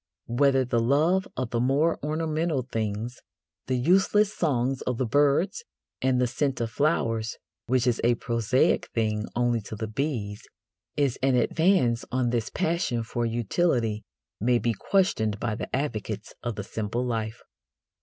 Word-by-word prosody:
Whether 135 +2 +3
the 120 -1 +1
love 155 +10 +2
of 130 -2 -2
the 120 - 0
more 140 +7 +2
ornamental 155 -1 -1
things 110 0 -3 0.5
the 130 - +1
useless 195 +8 +3
songs 135 -4 0
of 125 -2 -2
the 130 - 0
birds 145 - +2 0.4
and 130 -1 +2
the 125 - +3
scent 130 +2 -1
of 115 -1 -2
flowers, 115 -6 0 0.3
which 125 0 +2
is 120 -2 +1
a 120 +1 +4
prosaic 115 +2 +1
thing 110 -2 0
only 120 -1 +1
to 105 - -8
the 110 - -3
bees 110 -3 -3 0.6
is 140 -4 +1
an 135 -1 +3
advance 145 -4 +2
on 125 -2 +1
this 115 -2 -1
passion 165 -9 0
for 120 +1 -2
utility 115 - 0 0.4
may 120 +3 +3
be 120 0 0
questioned 110 - +1
by 115 -2 -1
the - - -5
advocates 110 -6 -3
of 120 -2 -3
the 105 - -4
simple 110 +4 -3
life. 115 -1 -3
125 Hz, 155 wpm, -26 LUFS, 115-145 Hz, 0.6 s, a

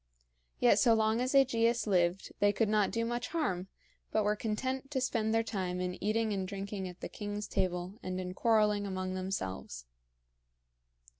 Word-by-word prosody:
Yet - - +5
so 230 -2 +5
long 220 +1 +2
as 255 +2 0
AEgeus 235 -3 +3
lived 180 -2 +1
they 205 0 +4
could 215 0 +1
not 210 -1 +3
do 230 0 -1
much 240 +1 -2
harm, 190 - -1 0.4
but 215 - +2
were 210 +1 +2
content 260 +6 -2
to 285 -3 -1
spend 225 -4 0
their 225 0 +3
time 185 -5 -3
in 180 0 -3
eating 215 +1 +1
and 190 -2 -2
drinking 195 0 -4
at 180 0 -10
the - - -3
king's 205 -1 -5
table 185 +1 -2
and 185 0 -3
in 180 0 -4
quarreling 210 -1 +2
among 185 -1 -3
themselves. 95 - -4
205 Hz, 170 wpm, -32 LUFS, 185-225 Hz, 0.4 s, Yet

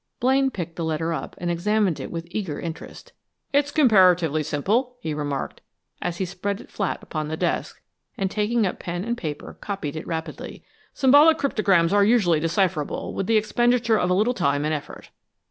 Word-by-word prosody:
Blaine 265 +2 +3
picked 170 -8 -6
the 170 - -2
letter 160 +1 -1
up, - - -5
and 175 -1 -2
examined 195 0 +1
it - - -6
with 165 -1 -5
eager 185 -8 -3
interest. 165 -1 -8 0.4
"It's 285 0 +3
comparatively 185 - +4
simple," 205 - 0
he 160 -10 -4
remarked, 145 -2 -4 0.4
as 175 -1 -3
he 190 - -1
spread 195 +2 -4
it - - -14
flat 200 -3 -3
upon 155 -1 -4
the 160 +1 -4
desk, - - -2 0.4
and 190 -1 -1
taking 215 +2 +1
up 185 - -3
pen 175 +1 -4
and 235 +1 -1
paper, 155 -10 -7
copied 190 -8 -4
it 155 - -6
rapidly. 160 -1 -6 0.3
"Symbolic 290 +4 +6
cryptograms 200 - +2
are 205 0 +5
usually 200 -7 +3
decipherable, 165 -2 -1
with 195 - -3
the 225 - +4
expenditure 235 +1 +2
of 180 - 0
a 180 - +3
little 215 +6 +2
time 145 - 0
and 155 - 0
effort. 150 - -7
185 Hz, 180 wpm, -24 LUFS, 160-220 Hz, 0.4 s, Symbolic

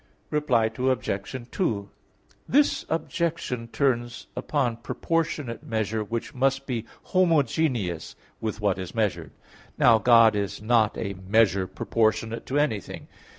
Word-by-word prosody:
Reply 125 -7 +2
Obj. 125 -2 -1
2: 105 - -1 0.6
This 285 +2 +3
objection 160 -6 -2
turns 120 -2 -1
upon 125 -2 -1
proportionate 155 0 -2
measure 110 -1 -1
which 115 +6 -4
must 135 +1 +1
be 120 -4 -3 0.2
homogeneous 140 - +1 0.2
with 110 -1 -3
what 100 -3 0
is 95 +2 -6
measured. 95 -9 -1 0.5
Now, 115 -2 +6
God 115 -2 +6
is 100 -1 -2
not 110 0 +2
a 100 - -3 0.2
measure 100 -4 +3
proportionate 110 +4 -1
to 135 - -1
anything. 125 - -2
115 Hz, 115 wpm, -26 LUFS, 110-135 Hz, 0.6 s, Now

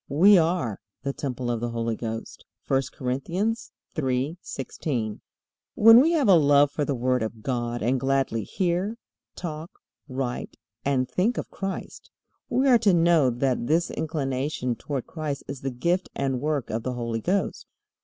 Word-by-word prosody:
We 185 +9 +6
are 160 - 0 0.2
"the 140 0 -2
temple 125 -4 -3
of 120 - -1
the 120 +1 -2
Holy 115 -1 -2
Ghost." 115 0 -6 0.3
(I 135 0 +4
Cor. 125 -2 -3
3:16.) 135 - -3 0.6
When 225 +3 +9
we 325 +5 +3
have 295 -7 +2
a 195 - +7
love 145 -3 +5
for 145 - -1
the 140 -1 -1
Word 125 +1 +1
of 110 0 -4
God, 120 -2 -2
and 125 +3 +2
gladly 135 -4 0
hear, 185 - -1 0.4
talk, 160 -1 -5 0.4
write, 130 -2 -4 0.3
and 130 -2 +1
think 200 - 0
of - - -4
Christ, 195 -1 -6 0.4
we 265 +2 +2
are 245 -3 +6
to 205 -5 +4
know 165 -5 +4
that 125 0 0
this 165 +3 +2
inclination 135 -4 -2
toward 135 -1 -4
Christ 150 -4 -4
is 140 -1 -6
the 135 - -2
gift 170 +9 -1
and 135 -2 -1
work 150 -3 -1
of 110 +1 -1
the 125 +2 -3
Holy 115 -2 -3
Ghost. 195 - -1
140 Hz, 160 wpm, -26 LUFS, 125-170 Hz, 0.6 s, When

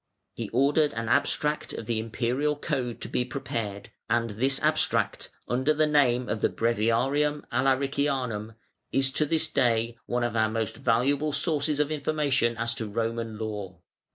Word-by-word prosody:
He 115 -3 -5
ordered 145 +4 +3
an 115 0 -3
abstract 150 +2 +1
of - - -6
the 115 0 -1
Imperial 125 +6 -1
Code 125 -4 -3
to - - -4
be 125 - 0
prepared, 115 -6 -4 0.2
and 115 -1 +1
this 130 +6 +1
abstract, - - +1 0.2
under 130 +5 +1
the 155 +1 +3
name 130 -5 +3
of 105 - -2
the - - +3
Breviarium 120 +6 +1
Alaricianum 130 -4 0 0.4
is 135 0 +2
to 150 +3 +1
this 160 +1 +1
day 115 -4 +1
one 120 0 0
of 120 -1 -1
our 110 -1 +3
most 110 -1 -2
valuable 140 +6 +1
sources 150 -1 +1
of 150 0 +1
information 140 -6 +1
as 115 0 -1
to 115 -2 -5
Roman 115 +1 -2
Law. 105 -5 -5
125 Hz, 155 wpm, -27 LUFS, 115-145 Hz, 0.4 s, ordered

